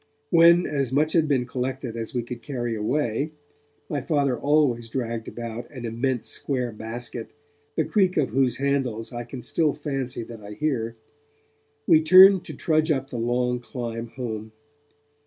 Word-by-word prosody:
When 170 +1 +6
as 135 -4 -1
much 150 +3 +2
had 160 -2 +3
been 135 -4 +1
collected 125 -1 -4
as 115 +2 -5
we 120 - 0
could 120 0 -7
carry 120 -3 -3
away 130 +5 -1 0.5
my 145 -2 -2
Father 140 -3 +1
always 135 -4 +1
dragged 115 -2 -3
about 115 0 -6
an 125 -4 -8
immense 120 +2 -1
square 125 -4 -2
basket, 115 +1 -5 0.5
the 160 - +1
creak 190 -4 +2
of 145 -7 +1
whose 125 -1 +2
handles 130 -5 -1
I 120 0 -5
can 125 0 -8
still 150 +4 +1
fancy 135 -5 -4
that 115 -1 -10
I 105 0 -9
hear 115 -4 -2 0.9
we 160 -4 +6
turned 185 +3 +8
to - - -7
trudge 155 -1 +1
up 135 -2 0
the 120 - -4
long 125 +1 0
climb 120 -2 -5
home. 110 -3 -6
125 Hz, 160 wpm, -25 LUFS, 115-145 Hz, 0.9 s, turned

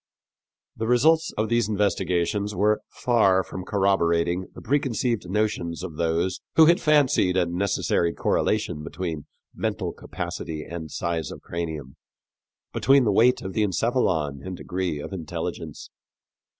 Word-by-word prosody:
The 110 - -3
results 155 +7 +4
of 110 +1 +1
these 115 -1 +1
investigations 100 0 0
were 105 +3 +2
far 100 -6 +2
from 95 - -7
corroborating 90 -3 +1
the - - -9
preconceived 120 -6 0
notions 95 -5 -1
of 85 -5 -6
those 85 +2 0
who 160 - +8
had 170 +2 +4
fancied 145 - +3
a 90 - +3
necessary 85 -1 0
correlation 90 -3 0
between 80 -1 -5 0.3
mental - - -2
capacity 80 -2 -5
and 80 -1 -7
size 85 -1 -2
of - - -9
cranium, 80 -6 -5 0.8
between 135 0 +4
the 110 - +2
weight 120 +5 +4
of 95 - -5
encephalon 95 - 0
and 95 -1 -6
degree 90 -4 -3
of 75 - -7
intelligence. 85 -5 -6
95 Hz, 130 wpm, -25 LUFS, 85-110 Hz, 0.8 s, who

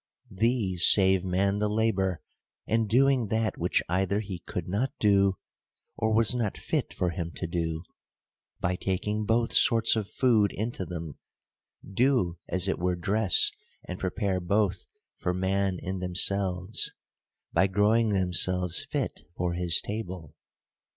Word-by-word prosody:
These 100 -4 +3
save 95 -2 +4
man 95 +2 0
the 105 0 0
labor; 100 -5 0 0.4
and, 115 -1 0
doing 130 0 +3
that 110 +1 -1
which - - 0
either 95 +3 0
he 95 -4 -6
could 85 0 -6
not 105 +8 -1
do, 100 -2 +3 0.6
or 110 0 -1
was 115 +1 +4
not 115 -5 -2
fit - - -2
for 90 -1 -2
him 85 -1 -5
to - - -4
do, 80 -1 -3 0.8
by 90 +1 -1
taking 105 +3 -2
both 115 +1 +1
sorts 115 -3 +5
of 105 -3 -3
food 110 -6 +2
into 110 -3 -4
them, 80 -3 -7 0.7
do 100 - +1
as 90 +1 -1
it 95 - -1
were 90 +1 0
dress 100 +2 +2 0.4
and 90 - -6
prepare 95 0 -2
both 95 +1 -1 0.3
for 90 -1 -2
man 95 0 0
in 95 +1 -5
themselves, 90 +1 0 0.6
by 95 - +3
growing 105 +4 +2
themselves 90 -2 +1
fit - - -4 0.2
for 90 -1 -1
his 85 -1 +2
table. 95 -7 -6
95 Hz, 140 wpm, -27 LUFS, 90-110 Hz, 0.8 s, sorts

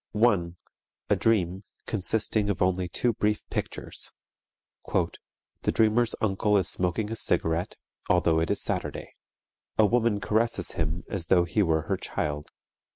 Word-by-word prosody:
1. 100 -6 +2 0.6
A - - +6
dream, 95 -4 +1 0.2
consisting 105 0 0
of 100 - -1
only 90 -1 +1
two 120 +7 +1
brief 105 0 -1
pictures: - - -4 0.8
"_The - - 0 0.5
dreamer's 110 +2 +3
uncle 105 0 +2
is 95 -3 +2
smoking 95 +4 0
a - - -2
cigarette, 85 -5 0 0.3
although 85 -2 +3
it 80 - 0
is - - +2
Saturday. - - -3 0.6
A 110 - +6
woman 115 -1 +2
caresses 115 +3 0
him 80 +2 -2
as 95 -4 -3
though 90 -2 +5
he 85 +5 0
were 80 -4 +2
her - - -1
child. 75 -1 -3
100 Hz, 140 wpm, -27 LUFS, 85-110 Hz, 0.8 s, A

